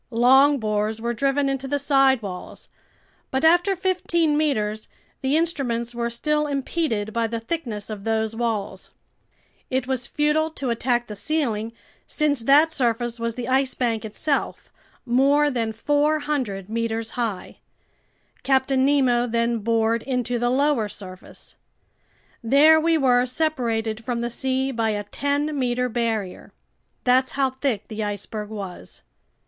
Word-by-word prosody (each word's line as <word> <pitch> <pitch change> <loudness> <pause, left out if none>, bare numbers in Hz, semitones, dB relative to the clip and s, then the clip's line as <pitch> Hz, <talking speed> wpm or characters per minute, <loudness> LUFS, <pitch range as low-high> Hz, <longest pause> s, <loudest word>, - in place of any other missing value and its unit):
Long 265 +5 +5
bores 215 -1 -1
were 235 +1 -2
driven 275 +3 +1
into 270 0 -2
the 285 +1 0
side 270 -3 +3
walls; 185 -3 -8 0.6
but 265 +4 0
after 350 +4 +4
fifteen 345 -4 +1
meters, 215 -8 -1 0.3
the 275 +3 +2
instruments 245 -8 -1
were 235 0 -2
still 300 +5 0
impeded 270 -6 -2
by 230 -1 0
the 230 +1 -3
thickness 230 -5 -4
of 210 -2 -6
those 220 0 -1
walls. 215 -5 -3 0.8
It 260 -1 -1
was 255 -2 -2
futile 300 +1 +1
to 275 -5 -3
attack 240 +1 0
the 210 - -8
ceiling 230 -4 -1 0.4
since 300 -3 +1
that 285 +7 +4
surface 240 -3 -1
was 230 -1 -2
the 245 -1 -5
Ice 265 0 +1
Bank 230 -3 -1
itself, 250 +7 -2 0.3
more 280 +4 +3
than 230 -3 -1
400 290 -5 0
meters 225 0 -2
high. 225 -6 -4 0.8
Captain 265 0 +2
Nemo 260 -4 +3
then 235 0 0
bored 225 +1 +1
into 245 -2 -2
the 240 +1 +1
lower 260 -4 +1
surface. 185 -2 -11 0.9
There 295 +7 +6
we 330 0 +3
were 250 -3 +3
separated 240 -6 -1
from 235 0 -2
the 240 0 -2
sea 265 +2 -1
by 230 -3 0
a 205 -1 -2
ten 285 +7 -2
meter 250 0 0
barrier. 225 -5 -3 0.5
That's 260 +1 +3
how 270 -1 +1
thick 255 -6 -2
the 215 -1 -4
iceberg 210 +1 -5
was. 195 - -8
245 Hz, 140 wpm, -23 LUFS, 225-280 Hz, 0.9 s, There